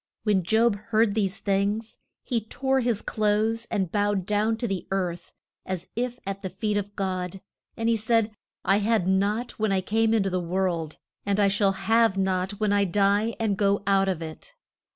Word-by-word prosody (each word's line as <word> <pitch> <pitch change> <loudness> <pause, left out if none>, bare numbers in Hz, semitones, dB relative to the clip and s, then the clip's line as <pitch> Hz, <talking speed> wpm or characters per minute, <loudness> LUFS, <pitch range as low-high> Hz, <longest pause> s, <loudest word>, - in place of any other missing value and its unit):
When 210 -3 +2
Job 220 +4 +2
heard 220 -2 +3
these 200 -2 0
things 205 +3 -1 0.2
he 235 -3 -1
tore 265 +3 0
his 235 -4 0
clothes, 215 +2 0
and 190 -6 -1
bowed 205 -2 0
down 210 +2 +1
to 240 - -2
the 195 -4 -3
earth, 180 -3 -2 0.3
as 185 -2 -5
if 245 +1 -2
at 195 0 -4
the 190 - -4
feet 210 +3 -2
of 205 0 -3
God. 185 -1 -3 0.4
And 225 0 -1
he 230 - +4
said, 225 0 +1 0.3
I 195 +1 +4
had 210 -3 +1
nought 205 +6 0
when 215 -1 +1
I 190 -1 +2
came 225 +3 +2
in 215 - +3
to 195 - -1
the 185 - 0
world, 170 -3 -2 0.3
and 200 0 0
I 200 -1 +4
shall 195 0 +2
have 220 +1 +2
nought 190 0 0
when 210 -2 +2
I 200 0 +3
die 200 +4 +2
and 220 -3 +1
go 200 0 +2
out 195 -1 +3
of 170 -3 -2
it. 165 - -9
205 Hz, 195 wpm, -26 LUFS, 190-225 Hz, 0.4 s, he